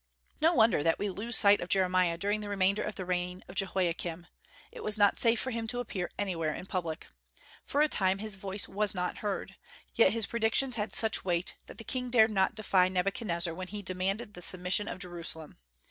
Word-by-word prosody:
No 330 Hz, +3 st, +4 dB
wonder 225 Hz, -, +4 dB
that 165 Hz, +1 st, +2 dB
we 205 Hz, -1 st, -2 dB
lose 225 Hz, +5 st, -1 dB
sight 205 Hz, -1 st, +5 dB
of 175 Hz, -, -5 dB
Jeremiah 185 Hz, -2 st, +2 dB
during 205 Hz, +4 st, -1 dB
the 205 Hz, -, -6 dB
remainder 200 Hz, 0 st, +1 dB
of -, -, -4 dB
the 185 Hz, -, -5 dB
reign 180 Hz, 0 st, -3 dB
of 180 Hz, -, -10 dB
Jehoiakim; 175 Hz, -3 st, -1 dB, 0.5 s
it 475 Hz, 0 st, -10 dB
was 215 Hz, -, +1 dB
not 205 Hz, -1 st, +3 dB
safe 230 Hz, -1 st, +3 dB
for 260 Hz, -, -3 dB
him 230 Hz, -1 st, -3 dB
to 245 Hz, +2 st, -3 dB
appear 195 Hz, -7 st, -4 dB
anywhere 165 Hz, -6 st, -1 dB
in -, -, -7 dB
public. 170 Hz, -4 st, -4 dB, 0.6 s
For 285 Hz, -, 0 dB
a -, -, +4 dB
time 190 Hz, -8 st, +1 dB
his 215 Hz, +1 st, -2 dB
voice 195 Hz, +1 st, -2 dB
was 205 Hz, 0 st, 0 dB
not 180 Hz, 0 st, -2 dB
heard; 195 Hz, -2 st, -4 dB, 0.4 s
yet 225 Hz, -5 st, +5 dB
his 225 Hz, -1 st, 0 dB
predictions 235 Hz, +3 st, +1 dB
had 215 Hz, -1 st, -2 dB
such 220 Hz, -1 st, +2 dB
weight 175 Hz, -1 st, -1 dB
that -, -, -11 dB
the 225 Hz, -, -7 dB
king 250 Hz, +1 st, -3 dB
dared 225 Hz, -2 st, +5 dB
not 190 Hz, -2 st, +1 dB
defy 190 Hz, -4 st, +3 dB
Nebuchadnezzar 180 Hz, -2 st, 0 dB
when 185 Hz, +2 st, -6 dB
he 205 Hz, +1 st, -7 dB
demanded 195 Hz, +4 st, -2 dB
the 180 Hz, -, -9 dB
submission 185 Hz, +3 st, +2 dB
of -, -, -5 dB
Jerusalem. 170 Hz, -, -6 dB
195 Hz, 205 wpm, -30 LUFS, 180-215 Hz, 0.6 s, sight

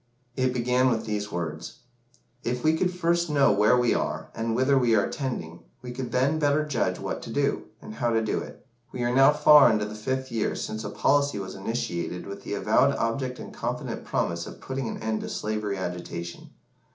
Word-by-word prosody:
It 130 Hz, -1 st, +1 dB
began 125 Hz, +1 st, +2 dB
with 115 Hz, -2 st, -1 dB
these 105 Hz, -1 st, -3 dB
words 85 Hz, -3 st, -5 dB, 0.6 s
"If 125 Hz, +1 st, -2 dB
we 155 Hz, +1 st, +4 dB
could 180 Hz, +2 st, +1 dB
first 170 Hz, -1 st, +1 dB
know 140 Hz, -4 st, +4 dB
where 105 Hz, +4 st, +4 dB
we 120 Hz, -1 st, +3 dB
are, -, -, -2 dB
and 115 Hz, 0 st, -2 dB
whither 130 Hz, +3 st, +3 dB
we 120 Hz, -4 st, +4 dB
are 100 Hz, -2 st, +3 dB
tending, 85 Hz, -, -4 dB, 0.2 s
we 125 Hz, -, -6 dB
could 125 Hz, -1 st, -5 dB
then 135 Hz, +5 st, +2 dB
better 150 Hz, 0 st, +2 dB
judge 140 Hz, -6 st, 0 dB
what -, -, -4 dB
to -, -, -8 dB
do, -, -, 0 dB, 0.2 s
and -, -, -8 dB
how 120 Hz, +2 st, 0 dB
to 115 Hz, -1 st, +1 dB
do 110 Hz, -, 0 dB
it. -, -, -10 dB, 0.3 s
We 125 Hz, -, -3 dB
are 120 Hz, 0 st, +1 dB
now 135 Hz, +2 st, +7 dB
far 150 Hz, -1 st, +7 dB
on 115 Hz, -, +4 dB
into 105 Hz, -1 st, 0 dB
the 105 Hz, -, -7 dB
fifth 130 Hz, +5 st, -3 dB
year 115 Hz, -2 st, -1 dB
since 110 Hz, 0 st, -4 dB
a 105 Hz, -, -4 dB
policy 140 Hz, +3 st, +2 dB
was 95 Hz, -1 st, -5 dB
initiated 90 Hz, -5 st, -3 dB
with 100 Hz, 0 st, -7 dB
the -, -, -4 dB
avowed -, -, +3 dB
object 125 Hz, +2 st, -2 dB
and -, -, -9 dB
confident -, -, -4 dB
promise 85 Hz, 0 st, -2 dB
of -, -, -10 dB
putting 130 Hz, -2 st, -4 dB
an -, -, -4 dB
end 110 Hz, -1 st, -1 dB
to -, -, -5 dB
slavery 105 Hz, -2 st, -2 dB
agitation. 85 Hz, -1 st, -6 dB
120 Hz, 210 wpm, -26 LUFS, 105-135 Hz, 0.6 s, now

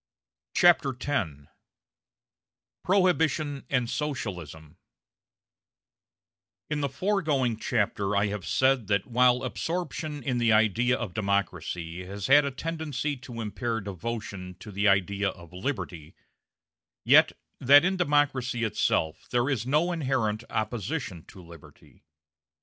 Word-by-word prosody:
CHAPTER 155 Hz, -7 st, +4 dB
X 125 Hz, -, 0 dB, 1.5 s
PROHIBITION 160 Hz, -6 st, +1 dB
AND 125 Hz, -3 st, +1 dB
SOCIALISM 90 Hz, -, -5 dB, 1.9 s
In 150 Hz, -1 st, 0 dB
the 140 Hz, -, 0 dB
foregoing 145 Hz, -, 0 dB
chapter 105 Hz, -3 st, -1 dB
I 100 Hz, +1 st, +3 dB
have 100 Hz, -2 st, -4 dB
said 130 Hz, -4 st, +2 dB
that 100 Hz, -1 st, +1 dB
while 125 Hz, +1 st, +3 dB
absorption 155 Hz, 0 st, -4 dB
in 125 Hz, -1 st, -1 dB
the 115 Hz, -1 st, +3 dB
idea 110 Hz, +4 st, +3 dB
of 110 Hz, -7 st, -5 dB
democracy 90 Hz, -4 st, -2 dB
has 100 Hz, +1 st, -6 dB
had 145 Hz, +4 st, +6 dB
a -, -, 0 dB
tendency 150 Hz, -1 st, -3 dB
to 120 Hz, -1 st, -8 dB
impair 110 Hz, +2 st, -2 dB
devotion 100 Hz, -1 st, -6 dB
to 105 Hz, -, -9 dB
the 100 Hz, +2 st, +1 dB
idea 100 Hz, +1 st, +2 dB
of 85 Hz, -2 st, -12 dB
liberty, 90 Hz, -, -5 dB, 0.9 s
yet -, -, +6 dB, 0.3 s
that 145 Hz, +5 st, +7 dB
in 190 Hz, +1 st, +1 dB
democracy 140 Hz, -8 st, +1 dB
itself 80 Hz, -7 st, 0 dB
there 120 Hz, +3 st, +1 dB
is 120 Hz, -3 st, -2 dB
no 155 Hz, +6 st, +2 dB
inherent 130 Hz, -9 st, -1 dB
opposition 110 Hz, -, -3 dB
to 95 Hz, -, -14 dB
liberty. 85 Hz, -2 st, -16 dB
120 Hz, 115 wpm, -27 LUFS, 100-145 Hz, 1.9 s, that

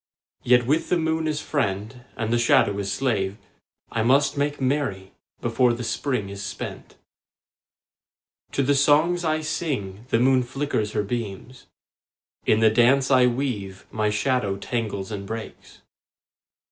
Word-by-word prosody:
Yet 125 Hz, 0 st, +4 dB
with 155 Hz, +6 st, +1 dB
the 180 Hz, -, +3 dB
moon 160 Hz, -1 st, 0 dB
as 155 Hz, -1 st, -1 dB
friend 110 Hz, -2 st, -3 dB
and 110 Hz, -1 st, -1 dB
the 120 Hz, -, +2 dB
shadow 100 Hz, -3 st, +3 dB
as 100 Hz, 0 st, -2 dB
slave 100 Hz, -3 st, -1 dB, 0.5 s
I 115 Hz, -, 0 dB
must 135 Hz, +6 st, +3 dB
make 145 Hz, +1 st, -1 dB
merry 130 Hz, -9 st, -1 dB, 0.3 s
before 120 Hz, +1 st, +2 dB
the 120 Hz, +1 st, -5 dB
Spring 115 Hz, -2 st, -2 dB
is 100 Hz, 0 st, -7 dB
spent. -, -, -7 dB, 1.6 s
To 140 Hz, -, +1 dB
the 145 Hz, +2 st, +3 dB
songs 155 Hz, +5 st, +3 dB
I 155 Hz, -1 st, 0 dB
sing 125 Hz, -, -3 dB
the 115 Hz, -, +2 dB
moon 130 Hz, +1 st, +4 dB
flickers 125 Hz, -4 st, -2 dB
her -, -, 0 dB
beams; 115 Hz, +3 st, -6 dB, 0.8 s
In 110 Hz, -, +4 dB
the 110 Hz, -1 st, +5 dB
dance 130 Hz, +4 st, +4 dB
I 130 Hz, -1 st, +6 dB
weave 120 Hz, -7 st, -3 dB
my 110 Hz, -1 st, 0 dB
shadow 105 Hz, -2 st, 0 dB
tangles 105 Hz, -2 st, -3 dB
and 100 Hz, -2 st, -5 dB
breaks. 115 Hz, +1 st, -8 dB
120 Hz, 145 wpm, -24 LUFS, 105-140 Hz, 1.6 s, I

